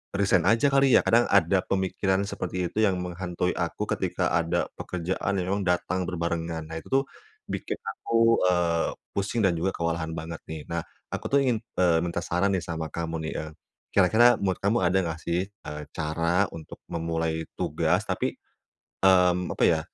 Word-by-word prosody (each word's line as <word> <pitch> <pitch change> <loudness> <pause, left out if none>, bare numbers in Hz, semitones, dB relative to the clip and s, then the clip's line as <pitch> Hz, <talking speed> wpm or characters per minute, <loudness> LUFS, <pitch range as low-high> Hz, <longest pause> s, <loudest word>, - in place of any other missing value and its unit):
resign 95 -3 +3
aja 115 +7 +4
kali 135 -1 +4
ya - - +8
kadang 120 +1 +5
ada 95 -1 +4
pemikiran 95 0 0
seperti 90 -2 -3
itu 110 - 0
yang 95 -2 +1
menghantui 90 0 -2
aku - - -2
ketika - - 0
ada 85 +1 +1
pekerjaan 95 +2 -2
yang 90 - -1
memang 100 -1 -1
datang 90 +1 0
berbarengan 85 -2 -3
nah 80 - -7
itu 80 - -9
tuh, 135 +1 +4 0.5
bikin - - -3
aku, 115 - +2
eee, 85 -2 +2 0.3
pusing 100 +4 -1
dan 90 - +3
juga 95 +4 0
kewalahan 85 -1 -2
banget 80 +1 -6
nih 80 -1 -5
nah 85 0 -1 0.3
aku - - -4
tuh 140 - +5
ingin, 120 -3 +2 0.2
eee, 85 -2 +4
minta 85 0 -2
saran 90 +4 0
nih 95 - +1
sama 80 -1 -3
kamu 85 -1 -3
nih, - - -5
eee, 80 0 -6 0.4
kira-kira 110 +6 +6
menurut 95 -2 -1
kamu 105 +4 +3
ada 90 +2 +3
enggak 80 -2 -4
sih, 90 +3 -1
eee, 75 -7 -8
cara 85 +4 +1
untuk 80 -2 -10
memulai 80 -1 -2
tugas - - +1
tapi, - - -1 0.7
mmm, 90 -1 +4
apa - - +3
ya - - +3
90 Hz, 175 wpm, -26 LUFS, 85-95 Hz, 0.7 s, ya